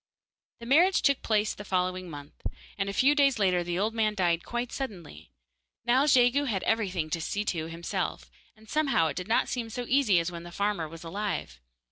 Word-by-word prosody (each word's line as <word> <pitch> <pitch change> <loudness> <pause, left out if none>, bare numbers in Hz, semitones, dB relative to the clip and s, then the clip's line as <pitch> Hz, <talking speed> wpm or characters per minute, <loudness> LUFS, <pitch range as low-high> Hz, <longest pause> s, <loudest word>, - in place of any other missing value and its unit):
The 235 - -9
marriage 335 +10 +4
took 280 -2 +3
place 215 -1 +1
the 205 - -9
following 185 -1 -1
month, 145 -2 -11 0.3
and 195 -1 -2
a - - -1
few 265 +8 +4
days 280 -3 +3
later 185 -4 +2
the 175 0 -3
old 215 +4 0
man 215 -2 +1
died 175 -3 +1
quite 240 0 -3
suddenly. 175 - -7 0.6
Now 255 +4 +3
Jegu 260 +1 +4
had 200 -8 -1
everything 185 -8 0
to 165 - -1
see 205 +6 -2
to 160 -5 -2
himself, 165 - -4 0.2
and 220 +1 -20
somehow 275 - +2
it 140 - -5
did 180 - -5
not 225 - +2
seem 235 -3 -3
so 245 +2 -4
easy 255 -8 +4
as 170 +1 -2
when 170 -1 -7
the 175 0 -10
farmer 200 -4 -1
was 165 +1 -10
alive. 170 - -4
205 Hz, 200 wpm, -28 LUFS, 170-240 Hz, 0.6 s, marriage